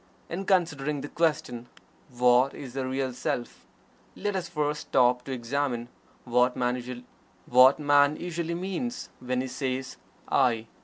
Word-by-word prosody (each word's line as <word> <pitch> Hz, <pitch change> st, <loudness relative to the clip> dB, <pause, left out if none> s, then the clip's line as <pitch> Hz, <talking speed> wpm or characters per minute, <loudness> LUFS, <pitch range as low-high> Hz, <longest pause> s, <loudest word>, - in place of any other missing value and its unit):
In 190 Hz, +3 st, -4 dB
considering 150 Hz, -7 st, +1 dB
the 145 Hz, -, -5 dB
question: 155 Hz, -7 st, -1 dB, 0.4 s
"What 125 Hz, +1 st, +3 dB
is 130 Hz, -4 st, -8 dB
the 130 Hz, -1 st, -2 dB
Real 130 Hz, -1 st, -2 dB
Self?" 120 Hz, -1 st, -4 dB, 0.5 s
let 205 Hz, 0 st, -2 dB
us 180 Hz, -2 st, -3 dB
first 150 Hz, -2 st, -1 dB
stop 125 Hz, -1 st, +3 dB
to 135 Hz, -, -6 dB
examine 125 Hz, -1 st, -2 dB, 0.4 s
what 125 Hz, 0 st, +2 dB
man 125 Hz, 0 st, 0 dB, 1.3 s
usually 170 Hz, -1 st, -3 dB
means 195 Hz, +7 st, -4 dB
when 125 Hz, 0 st, -1 dB
he 130 Hz, -, -3 dB
says 130 Hz, 0 st, -3 dB, 0.3 s
"I." 115 Hz, -3 st, +2 dB
135 Hz, 125 wpm, -27 LUFS, 125-160 Hz, 1.3 s, What